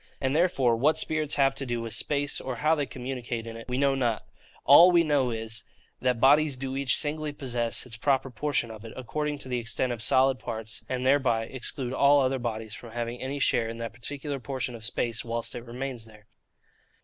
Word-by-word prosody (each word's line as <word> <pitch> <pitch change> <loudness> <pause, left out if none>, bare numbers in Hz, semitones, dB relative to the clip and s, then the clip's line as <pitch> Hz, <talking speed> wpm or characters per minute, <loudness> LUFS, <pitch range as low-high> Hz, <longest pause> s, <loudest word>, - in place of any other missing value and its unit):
And 135 +1 0
therefore, 140 -8 +3
what 145 +7 +3
spirits 155 -2 0
have 135 -1 +3
to 135 - -5
do 120 -3 -2
with 115 -1 -5
space, 145 +3 -1
or 130 -1 -4
how 155 +6 +2
they 145 -3 0
communicate 125 -3 -5
in 115 0 -7
it, 115 +2 -10
we 125 - -1
know 140 0 +3
not. 120 -5 -1 0.4
All 145 +6 +9
that 180 - +3
we 170 - +6
know 145 -5 +2
is, 115 0 -3 0.4
that 125 -2 +1
bodies 145 +1 +5
do 135 0 -4
each 135 -2 +2
singly 155 -1 -1
possess 120 -5 -2
its 115 -3 -8
proper 135 +1 +1
portion 125 -2 -1
of 110 -1 -10
it, 115 - -9
according 150 +4 -3
to 140 - -7
the 125 -1 -1
extent 120 +2 -1
of 115 - -7
solid 130 +1 +3
parts; 110 -2 -4
and 130 0 -2
thereby 130 -4 +3
exclude 130 +1 -4
all 140 +2 +5
other 135 0 +1
bodies 110 -2 -4
from 115 -1 -10
having 120 0 -4
any 135 +2 -3
share 115 -4 +2
in 115 - -6
that 115 -1 -5
particular 140 +3 -5
portion 130 +1 -4
of 115 -2 -9
space, 115 +1 -2
whilst 115 0 -3
it 120 - -7
remains 125 -1 -5
there. 105 -1 -17
130 Hz, 215 wpm, -27 LUFS, 115-140 Hz, 0.4 s, All